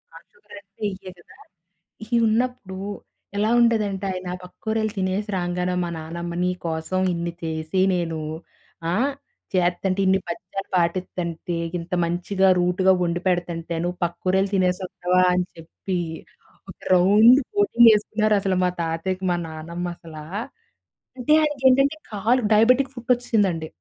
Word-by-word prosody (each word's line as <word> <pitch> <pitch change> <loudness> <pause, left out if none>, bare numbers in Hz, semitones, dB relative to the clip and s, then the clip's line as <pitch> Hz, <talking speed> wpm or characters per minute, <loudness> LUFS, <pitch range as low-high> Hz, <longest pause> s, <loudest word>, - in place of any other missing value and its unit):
ఆ! - - -9
షుగర్ 475 - -16
అంటే 200 +1 -15
ఇయ్యే 190 0 -9
కదా! - - -18 0.7
ఇయి 235 +2 0
ఉన్నప్పుడు 225 -4 -1 0.6
ఎలా 215 +2 +2
ఉండేదంటే 210 -4 +2
ఆయన 185 -1 -5
పక్కూరెళ్ళి 220 +3 -3
తినేసి 190 +3 -1
రాంగానే 180 0 -1
మా 175 - -3
నాన్నమ్మ, 170 +2 -6
"నీ 180 - +1
కోసం 160 +3 -2
ఇన్ని 170 0 -3
చేసి 160 +3 -2 0.2
నేను 165 -2 -2 0.7
ఆ! - - +1 0.6
చేత్తంటే, 185 +1 +1
ఇన్ని 190 +1 +3
పత్యాలు 195 +3 -6
పాటిత్తంటే, 170 -1 -1 0.2
ఇంత 170 +3 -10
మంచిగా, 185 +3 0
రూట్‌గా 180 +2 +3
వండిపెడతంటే, 175 -1 -1
నువ్వు 175 +1 -3
పక్కూరెళ్ళి 185 +3 0
తినేసి 180 0 +1
వస్తావా?" 180 0 +1
అని 180 0 +1
చెప్పి 175 +3 -5 0.7
ఒక - - -17 0.2
రౌండ్ 210 +8 +7 0.2
కోటింగ్ 240 - +5
వేసుకున్నారు 215 0 +1
అసలా 190 -1 0
మా 180 - +3
తాతయ్యకి 170 +3 -2
మా - - +2
నానమ్మ 170 +3 -6
అసలా. 155 -2 -10 0.9
అంటే 255 +4 +2
ఆయనకేంటంటే 275 -1 +3 0.2
కాలు 225 +5 +1
డయాబెటిక్ 250 +5 +4
ఫుట్ 240 -1 -11
వచ్చేసిందండి. 205 -9 0
185 Hz, 130 wpm, -23 LUFS, 175-215 Hz, 0.9 s, రౌండ్